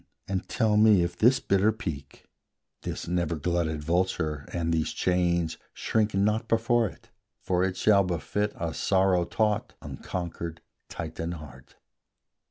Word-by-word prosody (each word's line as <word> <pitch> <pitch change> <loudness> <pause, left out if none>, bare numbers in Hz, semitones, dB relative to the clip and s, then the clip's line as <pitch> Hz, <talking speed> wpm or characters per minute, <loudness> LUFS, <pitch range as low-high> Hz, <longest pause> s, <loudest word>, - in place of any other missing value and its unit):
and 95 -1 -3
tell 110 -3 +2
me 105 -4 +6
if 85 0 -3
this 120 +7 +4
bitter 100 +3 +3
peak, 80 -10 -7 0.6
This - - -5
never 85 -1 0
glutted 80 -1 -1
vulture, 80 -3 -1
and 85 -1 -1
these 80 -1 0
chains 85 -2 +1 0.2
Shrink 110 -2 0
not 105 +3 +1
before 115 0 +2
it; 115 +4 -18 0.3
for 90 -1 0
it 95 -1 -1
shall 100 0 +4
befit 95 +4 -1
A 85 -1 -2
sorrow 95 -2 +2
taught, 105 +3 0
unconquered 85 -2 -5 0.3
Titan 80 +1 -5
heart. 70 -6 -12
90 Hz, 135 wpm, -27 LUFS, 85-105 Hz, 0.6 s, me